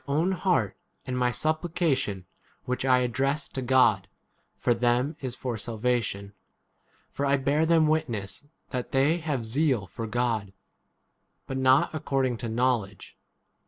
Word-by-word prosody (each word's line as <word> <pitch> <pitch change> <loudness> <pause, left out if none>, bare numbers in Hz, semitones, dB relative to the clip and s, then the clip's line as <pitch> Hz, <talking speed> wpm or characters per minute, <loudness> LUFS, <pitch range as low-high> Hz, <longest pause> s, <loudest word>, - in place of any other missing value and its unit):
own 155 +7 +1
heart 180 - +1 0.3
and 130 - -3
my 125 -1 +2
supplication 155 - -1 0.4
which 125 +1 -2
[I 130 -1 +4
address] 135 +5 0
to 130 - -4
God 120 -7 +3 0.5
for 120 - +2
2 115 - -8
them 120 +1 +3
1 160 - -11
is 130 -2 -4
for 120 -4 -4
salvation. 110 -3 -2 0.8
For 140 - -3
I 140 0 +3
bear 145 +4 +1
them 165 -1 +4
witness 140 -6 -1 0.2
that 125 -2 -4
they 140 +5 +3
have 145 -8 -2
zeal 130 -2 +1
for 115 +4 -6
God, 110 -4 -1 0.9
but 135 - -4
not 130 +3 +4
according 135 -5 0
to 120 - -4
8 - - -4
knowledge. 115 -5 -1
130 Hz, 150 wpm, -27 LUFS, 115-140 Hz, 0.9 s, I